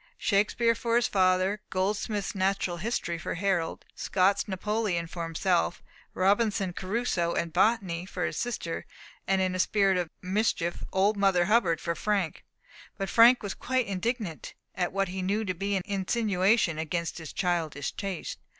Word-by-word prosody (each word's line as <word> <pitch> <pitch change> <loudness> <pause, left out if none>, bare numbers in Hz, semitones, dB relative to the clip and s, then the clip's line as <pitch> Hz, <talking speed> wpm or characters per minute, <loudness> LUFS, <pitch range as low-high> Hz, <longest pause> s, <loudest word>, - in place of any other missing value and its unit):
Shakespeare 220 +3 +2
for 230 0 -1
his 240 -1 +4
father, 185 +1 +2
Goldsmith's 200 +2 -1
Natural 190 -2 0
History 170 -4 -2
for - - -4
Harold, 185 -3 -1
Scott's 195 +2 +1
Napoleon 200 -2 -1
for 170 +1 -7
himself, 160 - 0 0.3
Robinson 200 0 +2
Crusoe 185 -3 -1
and 170 -1 -2
Botany 185 -3 +1
for - - -3
his - - -3
sister, 220 -9 -3 0.4
and 190 0 +2
(in 185 -1 0
a 185 - -3
spirit 195 -1 +3
of 175 -2 -2
mischief) 185 -3 -1
Old 200 +3 +2
Mother 195 -3 +3
Hubbard 185 -6 +3
for 170 - -2
Frank. 195 -1 -1 0.5
But 195 -2 -3
Frank 235 +4 +6
was 200 - -3
quite 255 -1 -1
indignant 200 -3 -3 0.2
at 180 -1 -1
what 195 -1 0
he 190 +1 -4
knew 205 +4 0
to 185 - -1
be 200 +3 -2
an 190 - -1
insinuation 200 -3 +1
against 170 +2 -3
his 160 -2 -8
childish 165 -6 -1
taste. 195 -4 -5
190 Hz, 155 wpm, -28 LUFS, 175-210 Hz, 0.5 s, Frank